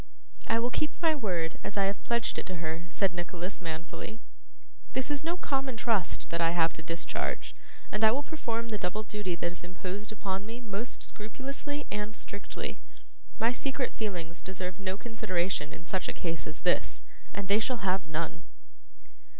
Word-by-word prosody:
'I 225 - +5
will 240 +2 +2
keep 305 - +1
my 325 -2 +5
word, 180 - 0
as 205 - -3
I 200 - +6
have 195 +1 +1
pledged 235 -1 +2
it - - -5
to 185 - -2
her,' 165 0 -2
said 195 -1 +3
Nicholas, 175 +2 -3
manfully. 170 +6 -4 0.7
'This 260 +2 +1
is 290 0 +1
no 335 +2 +1
common 270 -7 0
trust 215 -5 +2
that 170 0 +2
I 165 +1 +4
have 165 -1 +5
to - - -5
discharge, 165 +1 -1 0.4
and 210 +1 +1
I 220 - +10
will 265 +6 +2
perform 230 -7 -1
the 215 -2 -1
double 200 +4 0
duty 210 -4 -1
that 170 0 0
is 180 - -5
imposed 185 +3 -3
upon 195 -2 -1
me 230 +3 -5
most 225 0 -2
scrupulously 275 +6 -4
and 210 +1 -1
strictly. 200 -1 -4 0.6
My 230 +2 +5
secret 270 +1 0
feelings 175 -6 -2
deserve 185 0 -3
no 190 -1 0
consideration 185 -9 +1
in 165 - -8
such 185 +1 0
a - - -1
case 165 -2 -1
as 155 - -5
this, 175 - +2 0.3
and 200 -1 -3
they 200 +2 +6
shall 230 -2 +1
have 185 -2 +3
none. 160 +1 -1
200 Hz, 180 wpm, -32 LUFS, 175-230 Hz, 0.7 s, I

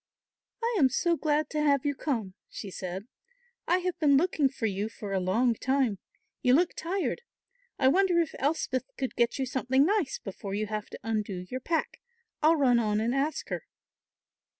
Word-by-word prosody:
"I 465 0 +1
am 265 -4 +5
so 340 +7 +1
glad 305 -1 +1
to 305 - 0
have 285 -2 +3
you 285 - +2
come," 230 -10 -2 0.2
she 200 - -7
said; 185 +2 -5 0.6
"I 355 - +4
have 360 -2 -2
been 285 -3 +5
looking 305 -3 +2
for 255 -4 -4
you 205 +1 -1
for 205 -3 -6
a 190 - +2
long 225 +7 +2
time. 255 -4 0 0.4
You 250 0 +5
look 345 +3 +2
tired. 375 +7 -2 0.6
I 260 - +3
wonder 360 +4 +4
if 330 -4 0
Elspeth 270 -3 0
could 265 -2 -3
get 235 -1 +2
you 270 - 0
something 260 +2 +2
nice 380 -7 +1
before 195 0 -6
you 215 +1 -1
have 210 0 -4
to - - -9
undo 210 -5 -2
your 255 - -2
pack. 325 +5 -2 0.4
I'll 315 +2 +5
run 255 -5 +4
on 210 -2 +1
and 230 +3 0
ask 280 +3 -1
her." - - -4
265 Hz, 185 wpm, -29 LUFS, 215-310 Hz, 0.6 s, am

